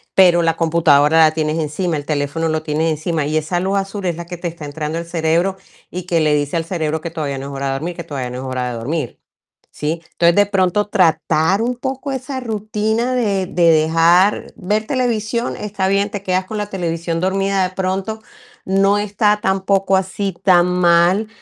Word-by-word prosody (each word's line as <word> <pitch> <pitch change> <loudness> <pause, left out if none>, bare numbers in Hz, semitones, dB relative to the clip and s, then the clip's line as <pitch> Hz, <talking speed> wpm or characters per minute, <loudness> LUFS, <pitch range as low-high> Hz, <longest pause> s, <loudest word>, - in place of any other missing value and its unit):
pero 175 -2 +6
la 165 -1 +1
computadora 160 -2 +3
la 155 -1 +6
tienes 155 0 -1
encima, 160 +3 -2
el 145 - -6
teléfono 150 +2 -1
lo 155 0 -1
tienes 155 +1 0
encima 155 0 -2
y 155 +2 -2
esa 165 +3 -1
luz 195 +2 0
azul 195 0 -4
es 175 -3 0
la 170 - -7
que 175 0 -7
te 175 - -4
está 170 -2 -8
entrando 150 +2 -4
al 170 - -4
cerebro 170 +3 0 0.3
y 180 0 -5
que 170 -2 0
le 150 -1 +2
dice 145 +1 -1
al 165 - -1
cerebro 160 -3 -2
que 170 - -5
todavía 145 -4 -3
no 135 - -6
es 140 - -7
hora 135 0 -3
de 135 - -1
dormir, 165 +6 -4
que 170 - -5
todavía 130 -4 -4
no 125 - -6
es 130 - -6
hora 130 -1 -3
de 120 - -5
dormir, 135 +3 -4 0.5
¿sí? 160 +2 -3
Entonces, 170 0 +3
de 205 0 +5
pronto 195 +1 +1
tratar 170 -1 +2
un 245 +1 -1
poco 265 +2 -4
esa 260 0 -4
rutina 220 +2 -1
de 200 -6 0
de 170 -3 +3
dejar 165 +5 +3
ver 210 +3 -1
televisión 235 -2 -1
está 200 -2 -2
bien, 200 +1 +1
te 205 - -4
quedas 185 0 0
con 215 +2 -6
la 210 - -2
televisión 170 -3 -3
dormida 195 +1 +1
de 185 - -14
pronto 190 +4 -2 0.4
no 195 +1 +3
está 210 +1 +1
tampoco 195 0 +1
así 190 +1 -2
tan 180 -2 +5
mal 180 +3 +3
175 Hz, 205 wpm, -18 LUFS, 160-200 Hz, 0.5 s, pero